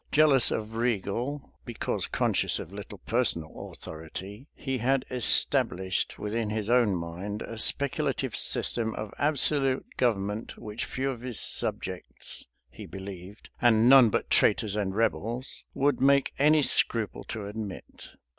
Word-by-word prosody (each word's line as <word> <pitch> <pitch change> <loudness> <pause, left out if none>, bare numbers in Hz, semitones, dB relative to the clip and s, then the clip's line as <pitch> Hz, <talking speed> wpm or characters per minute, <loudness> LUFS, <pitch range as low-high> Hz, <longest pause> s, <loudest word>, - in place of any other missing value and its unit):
Jealous 145 -5 +5
of 110 0 -4
regal, 120 +4 -2
because 120 -2 -3
conscious - - +1
of 90 - -8
little 105 +1 -9
personal 90 -7 -1
authority, 95 - -9
he 135 -2 -3
had 130 +3 +1
established 95 -6 +1
within 105 +1 -3
his 110 +1 -2
own 120 -6 +3
mind 90 +5 -5
a 115 - -7
speculative 140 -1 +2
system 110 -2 0
of 105 -1 -6
absolute 140 -2 +2
government, 105 -3 -1
which 105 +1 -5
few 135 +1 -2
of 120 -3 -8
his 125 -4 -1
subjects, 95 -7 0 0.2
he - - -10
believed, 95 +1 -10
and 115 -2 +4
none 130 -3 +8
but - - -2
traitors 105 -2 +3
and 100 -2 -2
rebels, 115 +3 -2
would 140 0 +1
make 140 0 +3
any 150 +1 +4
scruple 115 -4 +1
to 110 -2 -6
admit. 105 -2 -8
115 Hz, 135 wpm, -27 LUFS, 100-130 Hz, 0.2 s, none